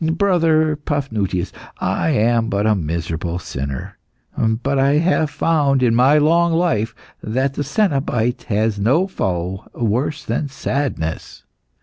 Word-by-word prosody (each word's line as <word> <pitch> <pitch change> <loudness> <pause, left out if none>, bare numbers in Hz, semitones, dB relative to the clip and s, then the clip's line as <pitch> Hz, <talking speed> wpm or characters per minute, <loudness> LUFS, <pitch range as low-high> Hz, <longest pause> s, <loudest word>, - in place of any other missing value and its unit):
Brother 160 -5 +2
Paphnutius, 110 - -2 0.3
I - - 0
am 115 -3 +2
but 100 +1 0
a 110 - +4
miserable 85 -1 -3
sinner, 70 -6 -6 0.4
but 120 +5 0
I 135 +1 +3
have 160 0 +2
found, 145 -4 +1
in 120 -2 +3
my 130 +5 +5
long 165 +3 +3
life, 160 -11 0 0.3
that 130 +5 -1
the 145 - -2
cenobite 135 - 0
has 105 0 0
no 135 - +3
foe 95 - -3
worse 120 +7 -1
than 150 - -1
sadness. 135 - -3
130 Hz, 125 wpm, -19 LUFS, 105-150 Hz, 0.4 s, my